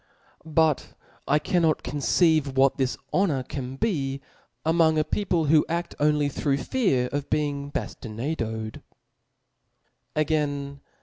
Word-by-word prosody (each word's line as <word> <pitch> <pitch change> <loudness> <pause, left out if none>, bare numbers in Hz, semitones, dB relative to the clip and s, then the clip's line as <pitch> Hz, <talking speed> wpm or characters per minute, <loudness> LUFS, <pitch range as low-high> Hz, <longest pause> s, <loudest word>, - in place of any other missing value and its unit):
But 160 -2 +1 0.3
I 145 - +4
cannot 160 0 +1
conceive 145 0 +2
what 135 0 +4
this 130 -2 0 0.2
honor 160 -9 +2
can 130 0 -6
be 135 -5 -1 0.5
among 160 -1 +3
a 155 - +3
people, 175 -1 0
who 150 +1 +5
aft 170 +1 -2
only 150 -1 +3
through 140 0 0
fear 140 - +1
of 145 0 -3
be 150 0 +2
ing 140 0 -5
baftinaded 110 -3 -4 0.7
*. - - -51 0.5
Again 145 -2 -1
145 Hz, 125 wpm, -26 LUFS, 135-160 Hz, 0.7 s, who